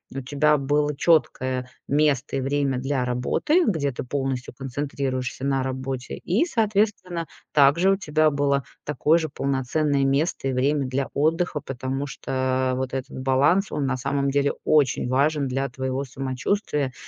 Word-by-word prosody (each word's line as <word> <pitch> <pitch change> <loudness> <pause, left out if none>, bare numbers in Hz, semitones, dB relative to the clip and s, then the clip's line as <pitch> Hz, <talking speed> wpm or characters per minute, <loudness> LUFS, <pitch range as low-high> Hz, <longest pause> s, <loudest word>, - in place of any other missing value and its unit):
у 135 - -3
тебя 145 +3 +2
было 145 +1 0
чёткое 130 -5 +1 0.2
место 145 -2 +1
и - - -1
время 140 0 0
для 135 0 -1
работы, 125 - +1
где 150 -8 +1
ты 125 - -5
полностью 135 -2 -3
концентрируешься 135 -1 -3
на 135 -1 +1
работе, 130 -1 -4
и, 200 - 0
соответственно, 205 - 0 0.2
также 150 +6 +5
у 195 - +2
тебя 155 -4 +2
было 140 -1 +1 0.2
такое 150 +2 +2
же 160 - -2
полноценное 140 +1 0
место 140 +1 0
и 135 - 0
время 140 +2 +1
для 135 +1 -2
отдыха. 160 +2 +1
Потому 135 +1 -4
что 130 -1 -1
вот 130 0 -3
этот 135 -1 -4
баланс, 140 +9 +2
он, 145 -2 -1
на 130 -1 0
самом 140 +2 -1
деле, 140 0 +2
очень 135 -5 +2
важен 140 +2 +1
для 135 +2 -1
твоего 130 +1 -3
самочувствия. 135 - -2
140 Hz, 150 wpm, -24 LUFS, 130-150 Hz, 0.2 s, также